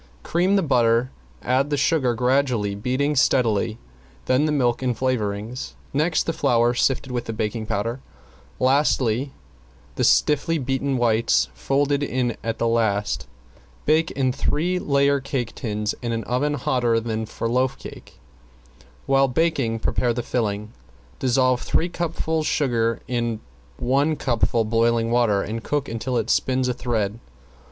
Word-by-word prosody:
Cream 180 +4 +1
the 195 - +3
butter, 120 -3 +2 0.3
add 130 +3 +1
the 145 - 0
sugar 135 -5 +2
gradually, 125 -4 +1
beating 130 +8 -1
steadily, 115 -4 +2 0.5
then 130 +4 +2
the 155 - +1
milk 125 -5 +1
and 125 -3 -1
flavoring, 110 -3 -2 0.4
next 155 +4 +1
the 165 - -2
flour 120 -5 +2
sifted 130 +1 0
with 120 -1 -3
the 115 - -4
baking 110 0 -3
powder, 105 +3 -1
and 130 +3 -9 0.6
lastly 135 -2 +2 0.7
the - - 0
stiffly 150 +3 +3
beaten 135 0 -1
whites 115 - +2
folded 140 - 0
in 125 -4 -1
at 115 0 -2
the 115 - 0
last. 110 -3 0 0.6
Bake 155 +1 +3
in 130 -2 0
three 175 +6 0
layer 140 -2 +2
cake 130 -3 -3
tins 105 -3 -3
in 120 -2 -2
an 115 -1 -2
oven 145 +5 0
hotter 120 -5 +1
than 110 -1 -3
for 115 - -4
loaf 130 +3 +1
cake. - - -12 0.9
While 135 0 +3
baking 135 -5 0
prepare 120 -1 +1
the 120 - -2
filling. 105 -3 -2 0.5
Dissolve 130 0 +2
three 175 - 0
cupfuls 160 -2 -2
sugar 115 -5 0
in 120 -3 -1 0.4
one 140 +5 +1
cupful 120 -4 0
boiling 115 +1 +1
water, 115 -5 +2
and 115 +2 -5
cook 145 -3 -1
until 120 +2 -2
it 115 0 0
spins 130 0 +1
a 125 - 0
thread. 115 -4 -2
125 Hz, 145 wpm, -23 LUFS, 115-140 Hz, 0.9 s, the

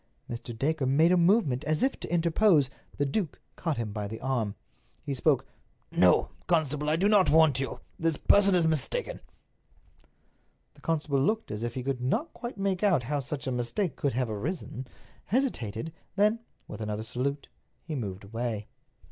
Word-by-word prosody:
Mr. 120 -1 -6
Dacre 145 +1 0
made 155 +6 +4
a - - +5
movement 170 - +3
as 155 +1 +1
if 270 - +1
to - - -6
interpose. 170 -4 +3 0.3
The 145 - +1
duke 150 +2 -2 0.2
caught 165 -4 -2
him 115 -3 -3
by 105 -1 -3
the 110 +2 -7
arm. 120 -6 -1 0.5
He 140 - -3
spoke: 135 0 +2 0.5
"No, - - +4 0.2
constable, 150 -4 +1
I 155 - +4
do 185 +5 +2
not 205 -3 +5
want 155 -4 +5
you. 135 - -4 0.2
This 165 -2 +1
person 200 -2 +5
is 170 -2 +6
mistaken." 485 - 0 1.5
The - - -21
constable 150 -4 0
looked 215 +10 0
as 105 +1 -4
if 120 0 -3
he 130 - -3
could 135 -1 -2
not 140 - -1
quite 240 -3 -7
make 195 -2 0
out 185 -11 +3
how 145 +4 -1
such 135 0 -4
a 130 - -1
mistake 125 - -1
could 140 - -1
have 125 +1 0
arisen, 130 - -4 0.4
hesitated, 160 - -1 0.2
then, 210 +3 +3 0.3
with - - -8
another 105 0 -3
salute, 130 +5 -3 0.3
he 165 - -6
moved 100 -8 -4
away. 110 0 -3
145 Hz, 175 wpm, -28 LUFS, 125-175 Hz, 1.5 s, is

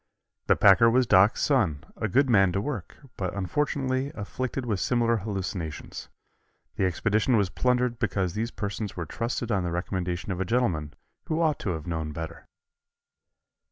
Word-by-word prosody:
The - - +5
packer 105 +4 +6
was 125 +2 +3
"Doc's" 100 0 +4
son, 95 - +1
a 110 - -2
good 135 +8 +3
man 95 -6 +4
to 100 - 0
work, 105 -4 -5 0.2
but 95 -1 -3
unfortunately 130 - -1
afflicted 125 +5 -4
with 105 -5 -1
similar 115 0 +2
hallucinations. 95 -6 -5 0.7
The 95 - +1
expedition 110 +6 +2
was 100 -3 +1
plundered 125 0 +1
because 95 -4 0
these 115 +2 -2
persons 105 -3 -5
were 85 - -3
trusted 120 - -3
on 95 -3 +1
the 90 - -2
recommendation 90 +1 -3
of 95 0 -3
a - - +3
gentleman 90 - 0 0.3
who 160 0 -1
ought 155 -4 +2
to 90 - -2
have 80 -2 -6
known 80 -3 -3
better. 80 +1 -7
105 Hz, 160 wpm, -27 LUFS, 90-125 Hz, 0.7 s, packer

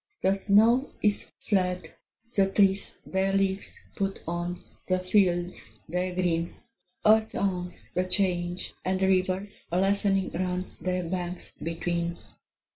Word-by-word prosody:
The 190 - +4
snow 220 +7 +4
is 210 -1 +2
fled: 185 -3 0 0.4
the 195 -1 +3
trees 195 0 +3
their 190 +1 0
leaves 195 0 0 0.2
put 195 -1 -2
on, 175 +1 -3 0.2
The 185 - +2
fields 185 -2 +1 0.2
their 180 +2 -2
green: 170 -2 0 0.5
Earth 220 +1 +5
owns 180 -2 -2
the 180 - +1
change, 180 -2 0
and 185 0 0
rivers 190 +1 0
lessening 195 +1 +2
run. 180 +1 -2
Their 185 0 -1
banks 180 +1 -4
between. 170 +1 -2
185 Hz, 120 wpm, -28 LUFS, 180-195 Hz, 0.5 s, Earth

